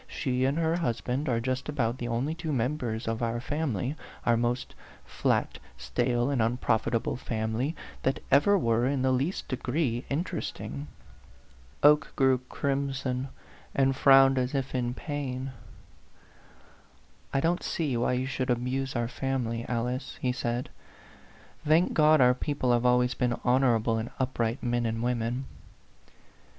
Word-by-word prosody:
Ske 130 -3 -1
and 140 +3 0
her 165 0 +1
husband 135 -2 -1
are 115 -2 +1
just 130 +4 -2
about 125 -4 -1
the 120 - -3
only 120 +6 -1
two 165 -1 -4
members 120 -3 -1
of 115 +1 -2
our 115 0 -1
family 135 - -2 0.3
our 120 - +4
most 120 +2 -1 0.3
flat, - - 0 0.2
stale, 120 - 0
and 135 -4 +1
unprofitable 115 0 0
family 115 +5 -2 0.3
that 135 - 0
ever 145 +10 +5
were 115 -5 +2
in 135 -1 0
the 130 - +3
least 135 +9 -1
degree 130 -2 -1
interesting." 75 - -4 1.0
Oke 145 -1 +5
grew 130 -1 +3
crimson, 135 -2 -2 0.5
and 135 -1 +3
frowned 135 -1 +6
as 125 +2 -1
if 135 -1 -2
in 125 -1 -1
pain. 135 -3 -4 1.8
"I 135 - +1
don't 170 +4 +1
see 150 -6 -1
why 120 +1 +1
you 125 +1 0
should 130 -1 -2
abuse 130 +2 -1
our 120 -1 0
family, 120 -2 -2
Alice," 125 +2 -2
he 125 - 0
said. 120 0 -3 0.9
"Thank 160 +4 +3
God, 155 0 +5
our 125 -1 +6
people 130 -1 0
have 120 +1 +2
always 125 0 +3
been 125 -1 -1
honorable 120 -3 +3
and 115 +2 -4
up 130 -1 -2
right 115 +2 0
men 120 -1 0
and 115 +1 -2
women 120 +1 -1
125 Hz, 145 wpm, -28 LUFS, 120-140 Hz, 1.8 s, frowned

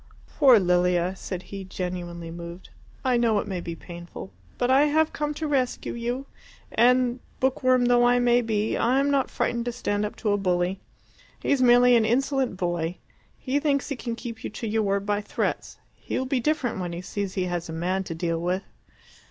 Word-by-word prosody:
"Poor 260 -7 +8
Lilia," 180 0 +2
said 185 -1 -6
he, 195 -1 -7
genuinely 175 -2 -5
moved. 170 +1 -9 0.4
"I 255 -2 +3
know 230 -3 +3
it - - -1
may 185 -3 -3
be 170 -1 -5
painful. 170 - -10 0.2
But 245 - +1
I 275 +3 +6
have 315 +1 +2
come 295 0 -2
to 315 - -3
rescue 265 -4 -1
you, 240 +3 -3 0.5
and, 250 +1 +3 0.2
book 265 0 +1
worm 255 -1 +4
though 245 0 +4
I 245 0 +5
may 245 0 +4
be, 220 -2 0
I 255 +3 +2
am 280 +1 +2
not 275 -2 +1
frightened 235 -1 -1
to 240 - -1
stand 205 -4 -1
up 210 - -3
to 215 - -1
a 205 - +2
bully. 180 -1 0 0.6
He's 280 -2 +2
merely 245 0 +6
an 225 -2 +4
insolent 260 -1 +1
boy. 175 -1 -2 0.4
He 270 +2 -1
thinks 285 -2 0
he 280 - -2
can 235 -2 -4
keep 230 -2 -8
you - - -3
to 225 +2 -6
your 220 +1 +1
word 200 -1 0
by 205 0 0
threats. - - -3 0.2
He - - -5
will 260 - -1
be 260 0 0
different 255 -5 0
when 175 -2 -3
he 170 - -5
sees 200 0 -4
he 185 - 0
has 175 -1 -3
a - - -4
man 180 +4 -1
to 165 - -5
deal 165 0 -1
with." 180 +3 -1
220 Hz, 205 wpm, -25 LUFS, 180-250 Hz, 0.6 s, Poor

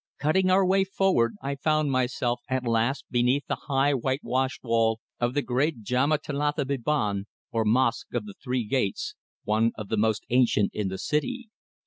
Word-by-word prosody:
Cutting 170 +7 +2
our 190 +1 +4
way 190 +1 +3
forward, 190 - +1
I 140 +1 -1
found 155 0 +1
myself 125 -1 0
at 130 -1 -1
last 115 +4 0
beneath 125 +3 +2
the - - -5
high 140 +1 +3
whitewashed 130 0 -1
wall 115 -2 +2 0.2
of 120 +2 0
the 145 - +1
great 130 -1 0
Djamäa 130 +7 +2
Thelatha 145 0 -1
Biban, 120 -7 -1 0.3
or 115 -1 +1
Mosque 120 +2 +1
of 115 -3 -1
the 100 - -9
Three 125 -2 -1
Gates, 105 -5 -1 0.3
one 110 +2 +2
of 105 -2 -7
the 110 - 0
most 110 0 +1
ancient 120 -5 +3
in 105 -2 -2
the 95 0 -4
city. 240 - -2
130 Hz, 170 wpm, -26 LUFS, 115-145 Hz, 0.3 s, our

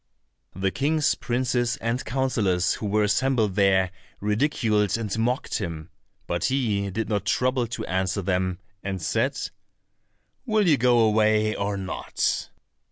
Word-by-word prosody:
The 95 +1 0
kings, 150 +4 +1
princes, 120 -1 -1
and 115 +3 -2
councillors 110 -9 +1
who 105 - -4
were 105 +1 +2
assembled 110 -1 +2
there, 95 -2 +3 0.3
ridiculed 105 -2 +1
and 105 -4 -3
mocked 125 +4 0
him, 85 -4 -5 0.3
but 85 - -1
he 110 -7 0
did 110 +4 -3
not 105 -3 -1
trouble 125 +3 +1
to 115 - -5
answer 95 +2 -1
them, 90 -1 0 0.3
and 95 -1 -3
said, 80 - 0 1.0
"Will 215 -5 +2
you 150 -4 +5
go 125 0 +4
away, 110 0 +3
or 100 -1 -2
not?" 95 -1 -2
105 Hz, 135 wpm, -25 LUFS, 95-125 Hz, 1.0 s, you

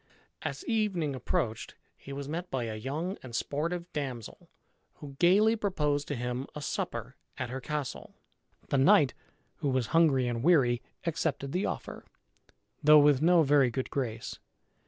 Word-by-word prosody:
As - - -5
evening 195 - 0
approached 115 -3 -2 0.2
he 140 - -12
was 140 0 -5
met 170 +4 -4
by 130 -2 -2
a 115 -1 -4
young 150 - -4
and 120 -3 -8
sportive 170 +7 -2
damsel, 130 -7 -5 0.5
who 140 -2 -10
gayly 205 +6 +5
proposed 150 -9 -1
to 145 - -2
him 125 +2 -3
a 150 - -5
supper 120 0 -4 0.2
at 130 -2 -4
her 130 +1 -4
castle. 150 -2 -5 0.5
The 140 - +2
knight, 135 0 +5 0.4
who 145 - -1
was 130 -2 +1
hungry 145 -6 +4
and 120 -1 -2
weary, 130 -6 +4 0.2
accepted 150 -4 -1
the 185 +5 0
offer, - - -6 0.8
though 150 0 +8
with 145 -2 +5
no 170 0 +5
very 140 -3 +4
good 130 +2 -4
grace. 115 -5 -4
140 Hz, 155 wpm, -30 LUFS, 130-165 Hz, 0.8 s, though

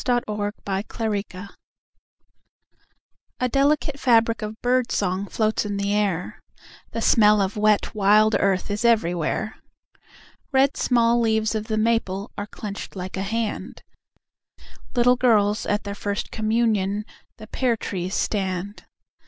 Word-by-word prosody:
VI 245 -1 +2
The - - -21
Dark 210 0 -3 0.3
Cup - - -14
May 205 -1 0
Day 185 -1 -10 1.9
A 250 - +1
delicate 280 +2 +1
fabric 230 -3 +3
of 215 +1 -6
bird 250 0 +1
song 195 0 -1
Floats 220 +1 0
in 205 -1 -3
the 200 0 -1
air, 195 -4 -1 0.5
The 230 - -4
smell 210 -2 +5
of 195 0 -1
wet 210 -1 +2
wild 215 +1 +4
earth 195 0 0
Is 210 +3 -2
everywhere. 215 -2 +1 0.9
Red 270 +1 +3
small 235 -1 +2
leaves 220 -1 +1
of 215 -1 -3
the 215 -1 -2
maple 215 -3 0
Are 205 - -5
clenched 205 -2 -7
like 185 0 -5
a 190 - -3
hand, 220 +2 -3 1.1
Like 245 0 +4
girls 210 -4 +2
at 205 0 0
their 200 - -5
first 200 0 -4
communion 215 -2 0 0.3
The 215 - -10
pear 235 +1 0
trees 185 -2 -4
stand. 195 0 -2
215 Hz, 140 wpm, -23 LUFS, 200-230 Hz, 1.9 s, smell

